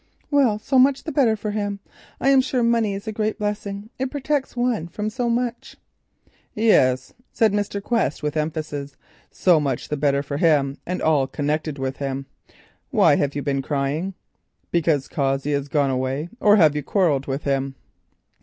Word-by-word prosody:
"Well, 265 -7 +3
so 260 +5 +1
much 270 +1 +4
the 315 - -4
better 260 -6 +3
for 210 0 -4
him. 205 -1 -2 0.4
I 270 - +2
am 270 -1 +6
sure 255 -2 -1
money 230 -3 +2
is 200 +3 -8
a - - -1
great 215 0 -2
blessing. 205 0 -4
It 265 0 -1
protects 285 -1 -2
one 240 -9 0
from 210 +5 -4
so 245 +1 -1
much." 240 0 -2 0.8
"Yes," 130 - +3 0.2
said 220 -3 +2
Mr. 205 -1 -2
Quest 205 - 0
with 150 +1 -2
emphasis, 150 -2 -3 0.3
"so 175 -4 +3
much 135 -4 -2
the 150 - -1
better 140 -1 +1
for 140 0 -4
him, 145 -4 +2
and 180 +1 -3
all 150 -4 +3
connected 150 +1 -2
with 135 0 -3
him. 135 -1 -3 0.6
Why - - +4
have 140 -1 -1
you 145 - -2
been 140 -1 0
crying? 145 +7 -2 0.6
Because 160 -5 +1
Cossey 135 -1 -1
has 140 -1 -1
gone 145 -2 +1
away—or 150 - +1
have 155 -7 +5
you 150 - -1
quarrelled 145 -4 +1
with 135 +1 -3
him?" 135 -1 -1
165 Hz, 175 wpm, -22 LUFS, 140-220 Hz, 0.8 s, am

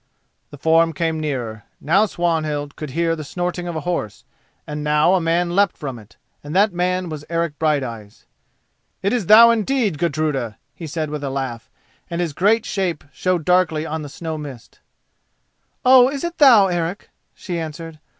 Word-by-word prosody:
The 145 - -11
form 165 +2 +3
came 160 0 -1
nearer; 120 -8 -4
now 195 +8 +3
Swanhild 155 -5 -2
could 155 - -6
hear 165 +3 0
the 155 - -7
snorting 175 +3 -4
of 170 - -4
a 160 - -3
horse, 170 - -3 0.4
and 150 0 -5
now 150 +4 +3
a 190 - +2
man 170 +1 0
leapt 200 -2 +2
from 135 -5 -6
it, 105 0 -18 0.3
and 145 +3 -7
that 200 +1 +4
man 180 +1 -1
was 155 -3 -6
Eric 165 -3 -2
Brighteyes. 125 -9 -2 0.8
"Is 210 +3 +1
it - - -12
thou 230 +2 +9
indeed, 225 - 0
Gudruda!" 150 -8 -1 0.2
he 165 - -8
said 155 0 -3
with 150 -1 -5
a 140 - -2
laugh, 130 -4 -5 0.4
and 170 0 -3
his 170 -4 -1
great 210 +8 +2
shape 185 -6 -2
showed 180 +1 -1
darkly 180 -4 +2
on 160 0 -4
the 145 - -7
snow 160 +2 -5
mist. 135 -6 -10 1.1
"Oh, 255 0 +7
is 280 0 -5
it 345 0 -4
thou, 245 -9 +7
Eric?" 175 +1 -3 0.2
she 175 -3 -5
answered. 160 0 -7
165 Hz, 175 wpm, -20 LUFS, 150-180 Hz, 1.1 s, thou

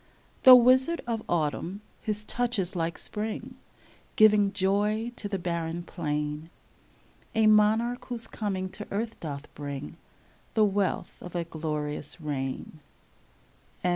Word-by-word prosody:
Though 255 -1 +13
Wizard 260 +7 +5
of 230 -2 -2
Autumn, 175 +4 -1 0.2
his 210 -1 -2
touch 245 +2 0
is 190 0 -1
like 165 -1 -1
Spring, 225 +4 -4 0.6
Giving 210 -2 +6
joy 210 +3 +1
to 205 - -4
the 195 - -1
barren 170 -1 -3
plain, 150 -2 -3 0.4
— - - -30
A 220 0 +4
Monarch 215 +3 +4
whose 240 -2 -3
coming 195 -3 -3
to 205 +3 -8
earth 220 +3 -3
doth 145 -2 -6
bring 145 +2 -6 0.6
The 215 -1 +5
wealth 200 -1 -1
of 180 0 -9
a 170 - 0
glorious 150 -2 -4
reign. 145 0 -4
195 Hz, 130 wpm, -28 LUFS, 160-220 Hz, 0.6 s, Though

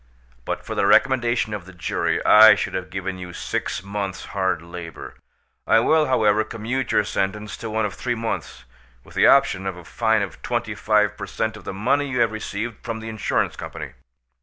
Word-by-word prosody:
But - - -4
for - - -4
the - - +1
recommendation 120 -4 +3
of 100 -4 -6
the 95 - -12
jury 85 -1 -1
I 110 0 +9
should - - -3
have 95 -1 -4
given 95 0 -4
you 90 -1 -8
six 85 - -3
months' 100 -1 -4
hard 95 -4 0
labour. 85 -1 -9 0.5
I 115 - +6
will, 155 +6 +3
however, 110 -4 +3
commute 115 +4 -3
your - - +3
sentence 105 +2 -2
to 110 - -6
one 110 0 0
of 100 - -3
three 120 +6 -2
months, 115 0 -4 0.4
with - - -16
the - - +4
option 95 +1 +4
of 95 -2 -4
a 90 - -12
fine 110 0 +1
of 95 - -7
twenty - - -2
five 105 -1 +2
per - - -6
cent. 110 -1 -2
of 105 - -12
the - - -4
money 135 +8 +1
you 125 -2 -1
have 115 -2 +3
received 110 +1 -5
from 115 -2 -4
the 110 0 -7
insurance 110 -2 -1
company." - - -7
105 Hz, 200 wpm, -23 LUFS, 95-115 Hz, 0.5 s, I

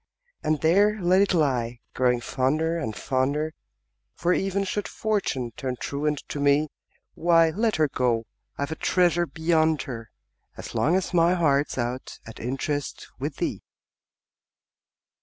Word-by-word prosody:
And 155 -1 0
there 205 +6 +4
let 185 +1 +4
it 200 - +3
lie, 125 -8 +1
growing 125 -1 +2
fonder 150 +7 0
and, 145 -11 -3
fonder 140 +4 -1 0.6
For, 175 +1 +1
even 195 +1 0
should 205 +1 -2
Fortune 195 - -1
turn 130 -2 -3
truant 150 +1 -2
to 145 - -4
me, 145 +2 +3 0.4
Why, 165 -1 +4
let 220 +4 +1
her 155 -1 +3
go 120 -4 0 0.3
I've 140 +2 -2
a - - -2
treasure 175 0 +2
beyond 160 -1 +1
her, 115 -4 -7 0.5
As - - -8
long 165 +5 +2
as 190 0 -1
my 170 +1 +4
heart's 145 -5 +1
out 125 +1 -3
at 110 - -10
interest 135 +3 -3
With - - -3
thee! - - -2
155 Hz, 140 wpm, -25 LUFS, 130-175 Hz, 0.6 s, there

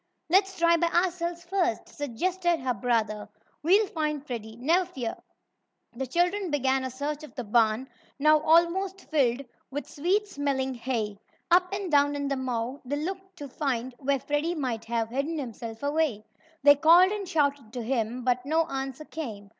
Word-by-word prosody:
"Let's 385 +1 +3
try 335 0 +4
by 340 - +2
ourselves, 345 0 0
first," 360 -1 0
suggested 345 +6 -1
her 255 -1 -1
brother. 215 -2 -1 0.3
"We'll 390 +7 +4
find 300 -5 -3
Freddie, 225 -4 -6
never 330 +9 +3
fear." 250 -9 -5 0.8
The 265 +2 -3
children 355 - +1
began 265 -2 +1
a 260 - -2
search 290 +4 -4
of 305 - -12
the 250 - -4
barn, 225 +3 +2 0.3
now 305 +2 +5
almost 345 +5 +2
filled 270 -4 +2 0.3
with 290 +2 -5
sweet 370 +8 0
smelling 275 -6 -1
hay. 230 -5 -3 0.3
Up 360 +1 +5
and 390 -3 -3
down 290 0 +4
in 285 0 -2
the 275 - 0
mow 255 0 -3
they 270 +3 -2
looked 375 +5 -5
to 290 -5 -7
find 260 -2 -2
where 275 0 +1
Freddie 295 +6 -1
might 245 -7 -3
have 225 -1 -1
hidden 280 +7 -2
himself 230 -3 -6
away. 285 -7 0 0.4
They 285 0 +8
called 340 +5 +7
and 405 -3 -4
shouted 285 - 0
to 245 -2 -4
him, 240 0 -1
but 250 0 +1
no 320 +4 +2
answer 270 -1 -5
came. 220 -12 -7
285 Hz, 170 wpm, -27 LUFS, 250-340 Hz, 0.8 s, They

